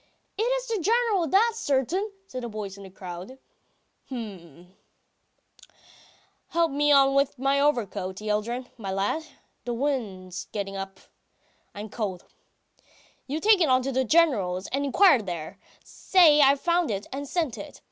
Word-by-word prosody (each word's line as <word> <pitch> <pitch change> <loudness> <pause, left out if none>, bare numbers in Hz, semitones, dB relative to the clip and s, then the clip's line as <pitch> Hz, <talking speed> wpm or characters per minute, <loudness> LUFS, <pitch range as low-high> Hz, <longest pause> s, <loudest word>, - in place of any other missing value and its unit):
"It 415 - -3
is - - 0
the 450 -3 -1
General's, 425 -4 +2
that's 450 +5 +3
certain!" 305 - 0
says 255 -9 -7
a - - -3
voice 210 -3 -6
in 200 - -12
the 195 - -10
crowd. 185 +6 -9 0.7
"H'm, 185 - -9 1.7
help 335 -2 +1
me 295 +1 +2
on 275 -1 +6
with 275 0 +1
my 275 +2 +1
overcoat, 205 -10 0
Yeldyrin, 215 +4 -2
my 195 -3 -4
lad... 195 +11 -1 0.4
the 240 -1 -3
wind's 210 -10 -3
getting 195 -2 -4
up.... 195 0 -7 0.7
I 205 - -6
am 215 - -7
cold.... 200 -5 -4 1.0
You 290 +4 -2
take 415 +1 +4
it 325 - +4 0.2
to 270 - -2
the 260 0 +1
General's, 220 - +2
and 280 +2 -1
inquire 285 - +5
there. 175 -6 -6 0.2
Say 325 -6 +4
I 275 0 +6
found 340 +1 +1
it 200 -1 -3
and 280 +1 -5
sent 315 -5 -2
it. - - -10
260 Hz, 150 wpm, -26 LUFS, 200-320 Hz, 1.7 s, on